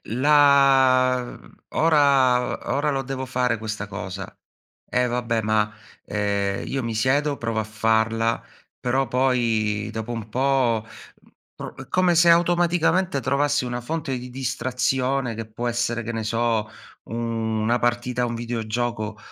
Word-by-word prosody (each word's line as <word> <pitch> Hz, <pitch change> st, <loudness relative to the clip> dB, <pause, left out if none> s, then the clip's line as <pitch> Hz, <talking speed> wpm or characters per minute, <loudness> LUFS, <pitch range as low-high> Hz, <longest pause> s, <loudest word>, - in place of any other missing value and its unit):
uhm, 115 Hz, +4 st, -3 dB
la 135 Hz, -3 st, +5 dB
mhmm, -, -, -13 dB, 0.2 s
ora 135 Hz, -6 st, +3 dB
ora 145 Hz, +2 st, +1 dB
lo 135 Hz, -1 st, -1 dB
devo 130 Hz, 0 st, -5 dB
fare 125 Hz, -3 st, 0 dB
questa 110 Hz, -1 st, -5 dB
cosa. 95 Hz, -1 st, -7 dB, 0.5 s
Eh, 125 Hz, 0 st, +1 dB
vabbè 120 Hz, -2 st, -1 dB
ma, 105 Hz, 0 st, +1 dB, 0.4 s
ehm, 100 Hz, -1 st, -1 dB
io 135 Hz, -1 st, -2 dB
mi 115 Hz, -1 st, -3 dB
siedo 140 Hz, +6 st, +1 dB
provo 115 Hz, -2 st, -2 dB
a -, -, -3 dB
farla 110 Hz, +1 st, 0 dB, 0.4 s
però 130 Hz, +2 st, 0 dB
poi 115 Hz, -4 st, 0 dB
dopo 110 Hz, +2 st, -4 dB
un 115 Hz, -2 st, -6 dB
po', 125 Hz, -3 st, +1 dB
mhmm, -, -, -17 dB, 0.3 s
pro -, -, -8 dB, 0.2 s
come 185 Hz, -1 st, +3 dB
se 170 Hz, +1 st, +6 dB
automaticamente 175 Hz, 0 st, +2 dB
trovassi 145 Hz, 0 st, +1 dB
una 120 Hz, 0 st, -4 dB
fonte 150 Hz, 0 st, -3 dB
di 125 Hz, 0 st, -9 dB
distrazione 130 Hz, 0 st, -1 dB
che 115 Hz, +1 st, -5 dB
può 120 Hz, +2 st, -4 dB
essere, 120 Hz, 0 st, -1 dB
che 115 Hz, +1 st, -5 dB
ne 115 Hz, -, -3 dB
so, 115 Hz, -1 st, 0 dB, 0.4 s
u 115 Hz, -, -8 dB, 0.5 s
una 115 Hz, +3 st, +1 dB
partita 120 Hz, +1 st, -1 dB
a -, -, +1 dB
un 120 Hz, -, -4 dB
videogioco 115 Hz, -2 st, -3 dB
120 Hz, 145 wpm, -23 LUFS, 110-135 Hz, 0.5 s, se